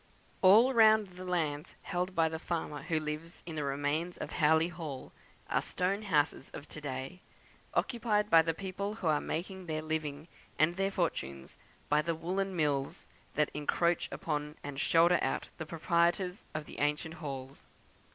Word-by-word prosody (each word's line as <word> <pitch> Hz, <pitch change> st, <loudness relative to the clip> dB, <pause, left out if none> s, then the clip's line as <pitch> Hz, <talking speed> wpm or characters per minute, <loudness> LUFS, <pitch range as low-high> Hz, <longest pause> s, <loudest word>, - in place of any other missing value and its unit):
All 220 Hz, +8 st, +7 dB
round 220 Hz, -3 st, +6 dB
the 180 Hz, 0 st, -10 dB
lands 160 Hz, -5 st, -2 dB
held 180 Hz, +1 st, -2 dB
by 165 Hz, -1 st, +4 dB
the 160 Hz, 0 st, -4 dB
farmer 160 Hz, -3 st, -3 dB
who 160 Hz, -2 st, 0 dB
lives 155 Hz, +2 st, -5 dB
in 170 Hz, -, -6 dB
the 150 Hz, -2 st, -2 dB
remains 145 Hz, +5 st, -1 dB
of -, -, -5 dB
Howley 160 Hz, +2 st, +3 dB
Hall 160 Hz, -6 st, -7 dB, 0.4 s
are -, -, +1 dB
stone 190 Hz, +3 st, -1 dB
houses 150 Hz, -8 st, +1 dB
of 145 Hz, -, -8 dB
to 155 Hz, -, -6 dB
day, 135 Hz, +5 st, -5 dB, 0.5 s
occupied 225 Hz, -4 st, +1 dB
by 165 Hz, -5 st, +7 dB
the 165 Hz, 0 st, -1 dB
people 200 Hz, +3 st, -4 dB
who 210 Hz, -, -7 dB
are 150 Hz, -2 st, +3 dB
making 185 Hz, +2 st, -4 dB
their 155 Hz, -1 st, -2 dB
living 155 Hz, -1 st, -3 dB, 0.3 s
and 155 Hz, +3 st, +3 dB
their 195 Hz, +1 st, +1 dB
fortunes 70 Hz, -, -3 dB, 0.3 s
by 150 Hz, +1 st, +3 dB
the 165 Hz, +2 st, -1 dB
woollen 185 Hz, +4 st, -2 dB
mills 145 Hz, -4 st, 0 dB, 0.3 s
that 150 Hz, 0 st, +2 dB
encroach 170 Hz, +3 st, +1 dB
upon 150 Hz, 0 st, -3 dB
and 140 Hz, -1 st, -5 dB
shoulder 170 Hz, +3 st, +5 dB
out -, -, -1 dB
the 160 Hz, -, -5 dB
proprietors 170 Hz, +3 st, +1 dB
of 155 Hz, -1 st, -3 dB
the -, -, -9 dB
ancient 150 Hz, +2 st, 0 dB
halls. 135 Hz, -2 st, -7 dB
165 Hz, 165 wpm, -32 LUFS, 150-180 Hz, 0.5 s, All